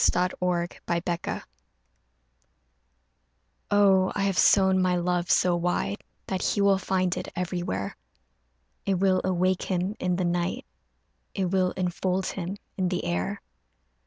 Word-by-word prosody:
AFTER 180 +1 +2 0.6
PARTING 170 0 -2 2.3
OH 195 -2 +4
I 200 - 0
have 195 -2 +1
sown 190 0 +5
my 180 -1 +2
love 175 0 0
so 180 -1 +4
wide 175 +4 -1 0.2
That 190 -1 -2
he 205 - +1
will 200 -1 +4
find 185 -1 0
it - - -5
everywhere; 175 - -3 0.9
It 195 - +1
will 185 0 +2
awake 185 0 +1
him 185 +2 -1
in 180 -1 0
the 180 0 -1
night, 175 0 -1 0.7
It 185 -2 -1
will 185 -1 +2
enfold 185 +1 -1
him 190 +1 -4 0.2
in 185 -2 +1
the 180 -1 -2
air. 90 +1 -2
185 Hz, 130 wpm, -26 LUFS, 175-190 Hz, 2.3 s, sown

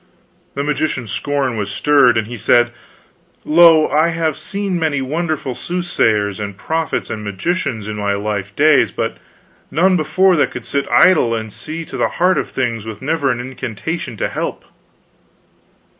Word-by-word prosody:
The 140 - -1
magician's 145 -6 -2
scorn 140 -3 -1
was 105 -1 -3
stirred, 125 +2 +4
and 110 - 0
he 120 +3 -7
said: 120 +2 +3 0.7
"Lo, 165 -1 +6
I 155 +2 +3
have 165 -2 -1
seen 195 -3 -3
many 155 -4 0
wonderful 155 0 -2
soothsayers 110 - -1
and 100 -2 -5
prophets 160 +8 -2
and 110 -1 -5
magicians 110 - -2
in 105 0 -5
my 100 -1 0
life 100 -1 -4
days, 150 0 +4
but - - -3 0.5
none 185 +6 +3
before 185 +3 +3
that 145 - +2
could - - -8
sit 140 0 -2
idle 155 -11 +4
and 110 -2 -5
see 160 +1 -6
to - - -7
the - - +1
heart 180 +2 +3
of - - -4
things 120 -4 -2
with 110 -2 -7
never 150 -1 0
an 120 -2 -1
incantation 125 - -5
to - - -1
help." - - -4
140 Hz, 160 wpm, -18 LUFS, 110-160 Hz, 0.7 s, Lo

